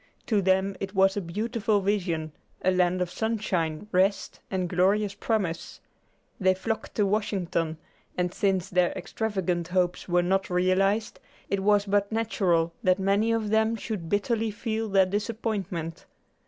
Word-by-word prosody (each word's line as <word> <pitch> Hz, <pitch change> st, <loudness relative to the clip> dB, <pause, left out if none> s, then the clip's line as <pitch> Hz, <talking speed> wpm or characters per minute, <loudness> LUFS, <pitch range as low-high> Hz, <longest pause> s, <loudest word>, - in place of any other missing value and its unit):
To 210 Hz, -4 st, +2 dB
them 190 Hz, +1 st, +2 dB
it 195 Hz, +1 st, -5 dB
was 195 Hz, 0 st, +4 dB
a 205 Hz, -, -1 dB
beautiful 215 Hz, +4 st, 0 dB
vision, 180 Hz, -6 st, -1 dB, 0.3 s
a 185 Hz, -, +4 dB
land 180 Hz, 0 st, +2 dB
of 175 Hz, -, -7 dB
sunshine, 205 Hz, -7 st, -1 dB
rest 195 Hz, +2 st, +1 dB
and 185 Hz, -2 st, -1 dB
glorious 195 Hz, +3 st, +2 dB
promise. 200 Hz, -5 st, -2 dB, 0.6 s
They 185 Hz, -2 st, +3 dB
flocked 220 Hz, +4 st, -4 dB
to 210 Hz, -, +2 dB
Washington, 185 Hz, -6 st, -1 dB, 0.4 s
and 180 Hz, 0 st, 0 dB
since 195 Hz, -4 st, +1 dB
their 180 Hz, -1 st, +2 dB
extravagant 185 Hz, -6 st, -2 dB
hopes 180 Hz, 0 st, 0 dB
were 175 Hz, 0 st, +3 dB
not 190 Hz, +2 st, +1 dB
realized, 190 Hz, +4 st, +1 dB, 0.3 s
it 200 Hz, -, +1 dB
was 205 Hz, +1 st, +3 dB
but 200 Hz, 0 st, +1 dB
natural 185 Hz, -7 st, +1 dB
that 185 Hz, -4 st, +3 dB
many 200 Hz, +3 st, +2 dB
of 220 Hz, -2 st, 0 dB
them 220 Hz, +1 st, +3 dB
should 200 Hz, -6 st, -5 dB
bitterly 220 Hz, +2 st, 0 dB
feel 220 Hz, 0 st, -3 dB
their 195 Hz, -1 st, +5 dB
disappointment. 200 Hz, -5 st, -3 dB
195 Hz, 145 wpm, -27 LUFS, 180-210 Hz, 0.6 s, their